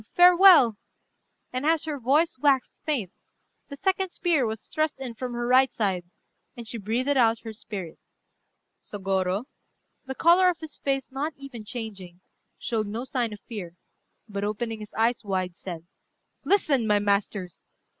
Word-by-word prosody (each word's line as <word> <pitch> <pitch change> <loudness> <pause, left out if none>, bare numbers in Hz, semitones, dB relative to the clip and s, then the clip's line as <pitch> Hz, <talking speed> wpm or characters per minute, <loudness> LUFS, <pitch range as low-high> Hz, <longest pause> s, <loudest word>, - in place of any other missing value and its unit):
farewell!" 355 - +7 0.8
and 255 +1 -2
as 320 +1 +2
her 300 -3 -4
voice 290 +7 +2
waxed 275 -2 +2
faint, 240 - -1 0.6
the 280 - -9
second 380 +2 0
spear 330 -8 +1
was 220 0 -5
thrust 310 -2 -1
in 255 -3 -5
from 245 +2 -5
her 240 0 -2
right 255 +2 +5
side, 190 -5 -1 0.5
and 235 -1 -8
she 230 - -6
breathed 225 +6 -1
out 230 -3 +3
her 225 -1 -7
spirit. 195 -6 -7 0.8
Sôgorô, 195 +1 -1 0.6
the 265 - -4
colour 355 +4 +5
of 350 - -1
his 315 -3 -9
face 270 -1 -2
not 285 +3 -3
even 275 -5 -9
changing, 205 -6 -8 0.4
showed 220 -3 -2
no 225 +5 -4
sign 250 -5 -1
of 210 - -9
fear, 190 -8 -8 0.5
but 200 -2 -4
opening 220 +2 -3
his 210 -1 -10
eyes 230 +2 +1
wide, 185 -3 -2
said 170 -3 -8 0.6
"Listen, 285 - +2
my 210 -1 +4
masters! 200 -3 -1
235 Hz, 155 wpm, -26 LUFS, 205-280 Hz, 0.8 s, farewell